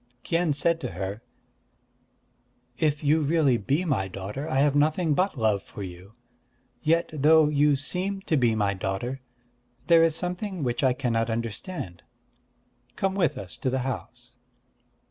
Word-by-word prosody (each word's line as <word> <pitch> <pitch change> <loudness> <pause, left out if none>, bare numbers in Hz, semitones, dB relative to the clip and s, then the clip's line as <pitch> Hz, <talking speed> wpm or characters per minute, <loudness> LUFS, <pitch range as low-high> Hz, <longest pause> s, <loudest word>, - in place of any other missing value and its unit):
Kien 170 -1 +1
said 165 +3 +1
to - - -4
her: 95 +4 -5 1.6
"If 150 -1 +1
you 155 +2 +3
really 145 -4 +3
be 140 - 0
my 130 - 0
daughter, 100 - -6
I - - -2
have 140 +1 +3
nothing 155 +2 +2
but 185 0 0
love 110 -4 +1
for 100 - -9
you. 90 +3 -10 0.7
Yet 165 +4 +1
though 155 +1 +5
you 145 0 +3
seem 185 +8 -2
to 160 - 0
be 120 -5 +3
my 100 -2 +1
daughter, 95 +7 -3 0.6
there 170 -1 +6
is 165 -2 +3
something 180 0 -3
which 120 0 -1
I 130 -1 +4
cannot 120 -3 -1
understand.... 115 - -4 0.9
Come 195 0 0
with 190 -4 +1
us 95 -3 -7
to 130 - 0
the 130 0 -1
house." 120 -1 -7
140 Hz, 150 wpm, -26 LUFS, 115-160 Hz, 1.6 s, there